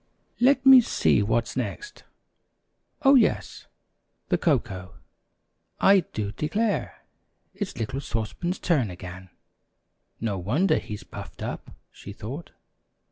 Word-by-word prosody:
"Let 265 +1 +4
me 265 -1 +10
see 225 - +2
what's 115 +3 0
next. 415 - -5 1.0
Oh, 275 0 +7
yes, 250 -6 +2 0.6
the - - +3
cocoa. 95 -2 -1 0.8
I 195 0 +6
do 105 - -4
declare, 205 - -2 0.5
it's 200 -4 -5
little 120 +4 -3
Sauce 110 -5 -3
Pan's 180 +1 -3
turn 140 - +1
again. 90 +1 -9 0.9
No 105 -4 -2
wonder 135 - +2
he's 105 -1 -8
puffed - - -9
up," - - -5 0.2
she 100 - -10
thought. 130 +11 -7
130 Hz, 115 wpm, -25 LUFS, -, 1.0 s, me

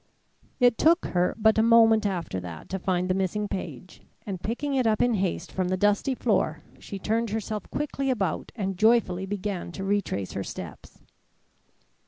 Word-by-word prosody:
It 245 -2 +4
took 335 +2 +4
her 180 0 0
but 220 0 +4
a - - +6
moment 225 -1 +5
after 170 - -3
that 85 -3 -9
to 190 - -3
find 180 0 0
the 185 - +2
missing 195 +2 -1
page, 180 -3 -7 0.2
and 190 -4 -5
picking 275 +6 -2
it 255 -3 +2
up 215 -1 +2
in 245 -1 +3
haste 190 -4 -2
from 185 -1 -1
the 185 +1 0
dusty 205 +7 +2
floor, 185 -10 0 0.2
she 200 - -7
turned 225 +4 -1
herself 215 -1 -4
quickly 275 -2 -2
about 195 -10 -1
and 195 -4 -3
joyfully 215 -5 +3
began 200 -3 -4
to 195 - -5
retrace 195 - -1
her 100 - -3
steps. - - -9
205 Hz, 175 wpm, -26 LUFS, 185-225 Hz, 0.2 s, a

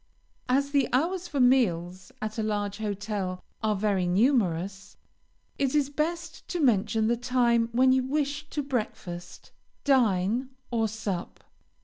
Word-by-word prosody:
As 275 +2 +2
the 280 -3 +2
hours 345 +7 0
for 290 -4 -3
meals, 190 -8 +2
at 215 +1 -4
a - - +2
large 205 -1 -2
hotel, 205 -3 -3 0.2
are 215 -1 +1
very 195 -3 +1
numerous, 195 - +1 0.6
it 275 0 +1
is 285 -1 +2
best 335 +3 -3
to 355 - -3
mention 225 -5 +2
the 235 +2 +2
time 240 -1 +2
when 260 +2 +4
you 260 0 +4
wish 290 +3 -2
to 295 - -2
breakfast, 185 -9 -5 0.3
dine, 240 -2 +2 0.2
or 225 -2 +1
sup. 205 -4 -5
230 Hz, 135 wpm, -27 LUFS, 200-275 Hz, 0.6 s, when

